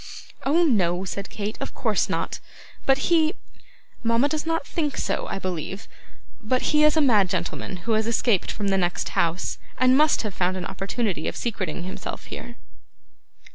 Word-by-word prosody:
'Oh, 325 +5 +4
no,' 190 - +2
said 195 +1 -5
Kate, 210 0 -4
'of - - -5
course - - +1
not; - - -2 0.5
but 275 +5 +3
he 320 +2 +4 0.7
mama 230 +4 +3
does 310 +1 -2
not 325 -3 0
think 300 -4 -2
so, - - -1
I - - -2
believe 185 +1 -4 0.5
but 255 +6 0
he 300 0 +5
is 305 +1 +5
a - - +5
mad 215 -9 +4
gentleman 180 +1 -3
who 230 - 0
has 220 0 +2
escaped 230 -4 +2
from 200 -1 -2
the 195 0 +2
next 175 -1 0
house, 170 +2 0 0.2
and 255 0 +5
must 305 -1 +4
have 210 -3 -3
found 185 +1 0
an 180 - -4
opportunity 195 -1 -2
of - - -2
secreting 220 -6 -3
himself 185 - -6
here. 240 - -8
220 Hz, 175 wpm, -25 LUFS, 185-275 Hz, 0.7 s, he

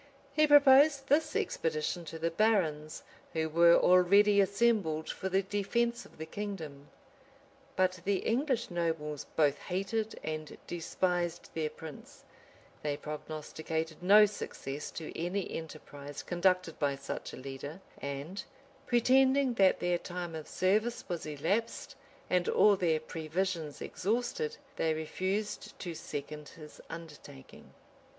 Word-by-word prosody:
He 305 +1 +4
proposed 280 0 +7
this 310 +8 +2
expedition 165 - -1
to 165 - -7
the 165 +1 -1
barons, 165 -7 +1 0.3
who 160 -1 0
were 170 +2 +6
already 200 +3 +5
assembled 200 -6 +1
for 190 - -4
the 190 +1 +2
defence 235 +5 -1
of - - -22
the 160 - -5
kingdom. 160 -7 -6 0.9
But 185 0 +1
the 200 +1 +1
English 255 -2 0
nobles 160 -4 -2
both 145 -2 +3
hated 205 +4 -2
and 155 -1 -5
despised 175 0 -2
their 155 -1 -1
prince: 160 -1 -11 0.6
they 145 -1 -2
prognosticated 155 +1 -5
no 205 +4 +8
success 150 -8 -5
to 160 - -7
any 180 +4 -2
enterprise 145 -3 -8
conducted 180 -2 +1
by 140 -1 +1
a - - -7
such 140 - -6
a - - -7
leader: 135 +5 -7 0.2
and, 140 +8 -5 0.4
pretending 260 +2 +4
that 195 -5 +4
their 175 0 +1
time 175 -1 -5
of 160 -1 -6
service 215 +6 0
was 175 -4 -4
elapsed, 165 +10 -2 0.3
and 180 -1 +1
all 210 -1 +5
their 165 -4 +1
previsions 160 0 -3
exhausted, 345 - -2 0.2
they 160 -1 +1
refused 190 +6 -3
to 175 -3 -5
second 150 -2 -6
his 150 -2 -13
undertaking. 150 -5 -11
175 Hz, 130 wpm, -31 LUFS, 155-205 Hz, 0.9 s, no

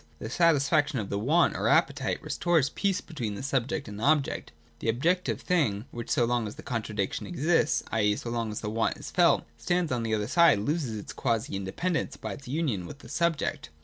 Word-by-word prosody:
The 110 +8 -6
satisfaction 150 -2 +3
of 105 -4 -3
the 100 - 0
want 155 +11 +3
or - - 0
appetite - - +2
restores 165 -6 +1
the - - -22
peace 195 -2 0
between 115 - -5
subject 135 +1 -1
and 105 +1 -7
object. 140 +4 +1 0.3
The - - -1
objective 170 - +1
thing 125 - +1
which, 120 -1 -6
so 120 - +3
long 120 -2 0
as 105 - -7
the - - -11
contradiction 110 -6 -3
exists, 165 -1 +1
i.e. 105 -2 +2
so 115 - -5
long 115 -2 -1
as 105 - -5
the 105 - -3
want 115 0 0
is - - -8
felt, - - +4
stands 175 -3 0
on 125 -2 0
the 110 -1 0
other 105 -1 -1
side, 170 0 +5
loses 125 0 -1
this - - -8
quasi 110 -3 -1
independence, 100 - -2
by - - -5
its 140 -3 -11
union 130 - -1
with - - -9
the - - -14
subject. 170 -3 -1
125 Hz, 205 wpm, -28 LUFS, 110-160 Hz, 0.3 s, side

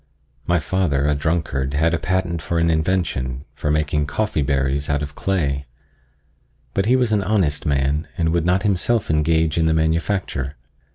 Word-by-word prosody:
My 90 - +3
father, 75 -3 0
a 75 - +3
drunkard, 75 -3 -1
had 80 +3 +2
a 85 - +1
patent 90 -2 -1
for 85 +2 -2
an 85 0 +3
invention, 80 -6 -1
for 75 - -3
making 75 -1 +1
coffee 100 +2 -1
berries 70 +1 0
out 75 +1 0
of 70 -1 -6
clay; 70 -7 -1 1.1
but 95 +1 0
he 125 - +5
was 125 -3 +2
an 105 -2 +2
honest 95 -8 0
man 70 +2 0
and 80 -1 +1
would 85 0 +1
not 90 +3 +2
himself 105 +1 +1
engage 80 +1 +2
in 80 - +3
the 80 - +2
manufacture. 80 -3 -1
80 Hz, 170 wpm, -21 LUFS, 70-90 Hz, 1.1 s, he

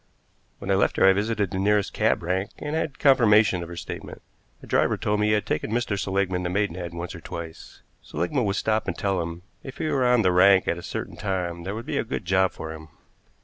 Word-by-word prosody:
When 95 - -4
I - - +5
left 95 - +2
her - - +5
I 95 - +7
visited 105 -1 -1
the 95 - -2
nearest 105 0 +1
cab - - +1
rank, 95 +3 -1
and 150 +1 -4
had 155 -3 -2
confirmation 110 - +4
of 85 - -7
her 85 - -7
statement. - - -8 0.4
A - - -9
driver - - +1
told 105 0 0
me 105 - +2
he 105 - +3
had 105 - +1
taken - - -2
Mr. 120 -3 0
Seligmann 95 -2 -1
to 90 - -1
Maidenhead 90 -3 -2
once 85 +1 -5
or 85 - -9
twice. 85 0 -9 0.2
Seligmann 115 +8 -2
would 100 -1 0
stop 110 +1 0
and 85 - -3
tell 95 -3 0
him 85 +1 -6 0.2
if 135 - -9
he - - -3
were 130 -4 +2
on 125 -2 +4
the 90 - +3
rank 95 +1 +5
at 85 - 0
a - - -8
certain - - -6
time 90 -4 -3
there 100 +2 -3
would 115 +2 -6
be 150 -1 -2
a - - 0
good 115 -4 -5
job 95 +1 +2
for 80 0 -7
him. 80 0 -11
95 Hz, 240 wpm, -25 LUFS, 90-110 Hz, 0.4 s, I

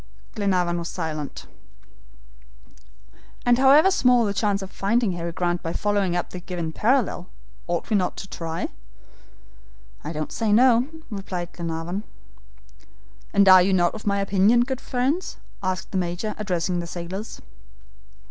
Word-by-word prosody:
Glenarvan 180 -5 0
was 170 - -5
silent. 155 -3 -5 2.0
"And 245 0 +4
however 290 +8 +6
small 250 -9 +4
the 200 - -1
chance 200 -1 0
of 190 - -9
finding 220 +1 +1
Harry 170 -1 -4
Grant 175 0 -1
by 165 - -4
following 200 -4 0
up 175 - -2
the 180 - -6
given 175 -2 -4
parallel, 220 -3 0 0.4
ought 175 -1 -2
we - - +4
not 185 -3 0
to 195 - -7
try?" 165 -3 -4 1.3
"I 150 - -5
don't 155 -1 -4
say 225 -3 -1
no," 245 +2 +5 0.2
replied 185 -4 -5
Glenarvan. 170 +3 -4 1.3
"And 200 -1 +4
are 185 -1 +9
you 190 +2 +2
not 175 -2 +3
of 215 -1 -8
my 200 0 +2
opinion, 200 +4 +4
good 260 +1 -2
friends," 270 +8 -1 0.2
added 185 -1 -2
the 190 - 0
Major, 175 +4 -2
addressing 180 -3 -1
the 170 - -4
sailors. 180 +5 -6
190 Hz, 145 wpm, -24 LUFS, 175-220 Hz, 2.0 s, are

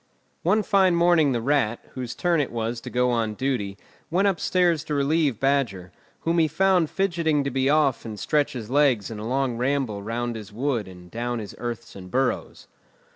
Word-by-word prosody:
One 210 +5 +2
fine 190 -3 +3
morning 170 -4 +4
the 120 -3 -1
Rat, 130 -4 +1
whose 125 -2 -5
turn 170 -3 +2
it 145 - -3
was 115 0 -3
to - - -7
go 125 0 +1
on 115 -3 0
duty, 120 -7 -2 0.3
went 190 +5 +2
upstairs 175 -4 +2
to 150 - -2
relieve 145 -3 +1
Badger, 120 -11 0 0.3
whom 165 +1 +1
he 160 - +4
found 180 +1 +2
fidgeting 170 -6 +1
to 140 - -2
be 130 +1 +1
off 145 -4 +2
and 110 -3 -7
stretch 145 -1 +1
his 120 -3 -7
legs 130 -8 +3
in 110 - -6
a 110 - -5
long 130 -1 0
ramble 125 -5 -1
round 120 +3 -3
his 105 -2 -8
wood 120 -1 -1
and 90 -1 -13
down 120 +1 -2
his 105 -3 -6
earths 120 -2 -5
and 90 -2 -10
burrows. 130 +6 -1
135 Hz, 190 wpm, -25 LUFS, 115-155 Hz, 0.3 s, morning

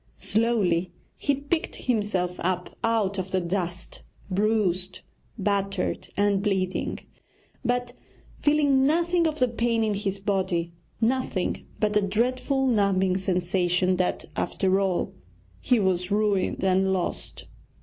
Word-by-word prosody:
Slowly 195 -6 +1 0.2
he 285 - 0
picked 285 +4 -2
himself 205 -7 -1
up 180 0 -2
out 215 -4 +1
of 190 0 -4
the 190 - +1
dust, 175 0 -3 0.3
bruised, 190 -3 0 0.4
battered, 195 -2 -1
and 200 -1 +2
bleeding, 190 -3 -1 0.7
but 245 0 -1 0.5
feeling 285 -3 +3
nothing 340 +2 +2
of 310 -1 -2
the 255 - +3
pain 230 -1 0
in 215 -1 +1
his 200 -1 -2
body, 190 -4 -1 0.3
nothing 235 -5 -1
but 210 -1 +1
a 210 - +5
dreadful 250 +7 0
numbing 195 -6 +2
sensation 180 0 +1
that, 180 -1 0
after 190 0 +1
all, 190 -3 0 0.5
he 250 - +2
was 185 -2 +1
ruined 205 -3 +1
and 190 0 +3
lost! 185 -2 -3
200 Hz, 120 wpm, -26 LUFS, 185-230 Hz, 0.7 s, a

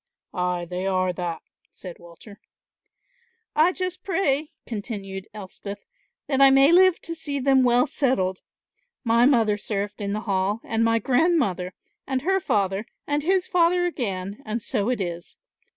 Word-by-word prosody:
"Ay, 180 -1 -1
they 180 +2 -4
are 185 -1 +1
that," 175 -2 -4 0.3
said 180 -3 -10
Walter. 175 +5 -14 1.2
"I 315 +4 +5
just 365 0 -4
pray," 310 -6 0 0.2
continued 200 -3 -6
Elspeth, 200 0 -9 0.4
"that 270 -1 0
I 275 - +9
may 270 +3 +6
live 370 0 +5
to 335 - -5
see 295 -3 -4
them 270 0 +3
well 245 0 +4
settled. 245 -10 0 0.6
My 235 0 +4
mother 225 -6 +3
served 205 0 -4
in 200 0 -2
the 215 - -2
Hall 200 0 0
and 225 0 0
my 230 0 +3
grandmother 245 - +1 0.3
and 265 -1 -1
her 385 +3 +2
father 210 - -1 0.2
and 290 0 0
his 370 +3 +1
father 355 0 +2
again, 200 - -3
and 215 +2 -3
so 220 -1 -2
it 250 - 0
is. 175 -2 -5
230 Hz, 150 wpm, -24 LUFS, 195-285 Hz, 1.2 s, I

